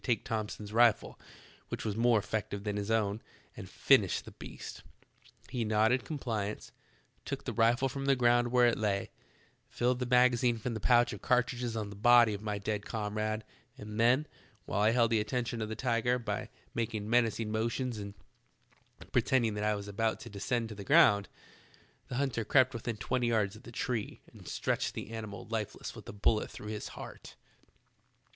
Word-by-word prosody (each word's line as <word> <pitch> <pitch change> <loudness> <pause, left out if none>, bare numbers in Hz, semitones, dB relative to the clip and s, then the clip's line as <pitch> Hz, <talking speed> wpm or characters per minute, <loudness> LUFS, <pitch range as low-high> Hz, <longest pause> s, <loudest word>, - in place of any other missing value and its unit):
take 120 -5 0
Thomson's 105 -1 -4
rifle, 115 -1 +3 0.5
which - - -5
was 105 -2 -1
more 115 0 +4
eflective 100 -1 -3
than 105 -1 -2
his 105 0 -3
own, 110 -1 +1 0.3
and - - -9
finish - - +3
the - - -12
beast. - - -9 0.7
He 120 - -1
nodded 110 +3 +2
compliance, 110 -9 -4 0.5
took - - -5
the - - -4
rifle 120 +3 +3
from 135 +1 -5
the 135 - +5
ground 120 -1 +3
where 125 0 +4
it 120 - +2
lay, 100 -2 -1 0.6
filled 125 +1 0
the 125 - -2
magazine 125 -1 +4
from 115 +2 -3
the 110 - -4
pouch 120 +2 +4
of 105 - -8
car 125 -1 +3
tridges 120 -1 -4
on 105 -1 -5
the - - -9
body 120 +1 +6
of 100 - -5
my 105 -1 -2
dead 105 0 -3
comrade, 110 0 -3 0.3
and 105 -2 -7
then, 125 +6 +4 0.4
while 105 - -1
I 105 - +5
held 115 0 +3
the 115 - +3
attention 115 +1 -2
of 110 - -3
the 110 - -4
tiger 120 0 +1
b}^ 120 - -3 0.3
making 110 -2 -2
menacing 115 -2 +1
motions 115 +2 -1
and 100 0 -7 1.0
pretending 120 -5 +2
that 105 0 -3
I 105 0 +2
was 100 0 -6
about 110 +2 -1
to - - -9
descend 115 +3 -2
to 110 - -7
the 100 - -8
ground, 125 - +5 0.8
the - - -5
hunter 130 -4 0
crept 130 +3 +4
within 115 -1 -4
twenty 120 +3 -1
yards 110 -4 +1
of 110 - -13
the 120 - -12
tree 115 -2 -3
and - - -14
stretched - - -1
the - - -6
animal 110 -2 -6
lifeless 110 -3 -4
with - - -10
a - - -4
bullet 105 +1 +1
through 105 - -9
his 105 -1 -4
heart. - - -10
115 Hz, 185 wpm, -31 LUFS, 105-120 Hz, 1.0 s, body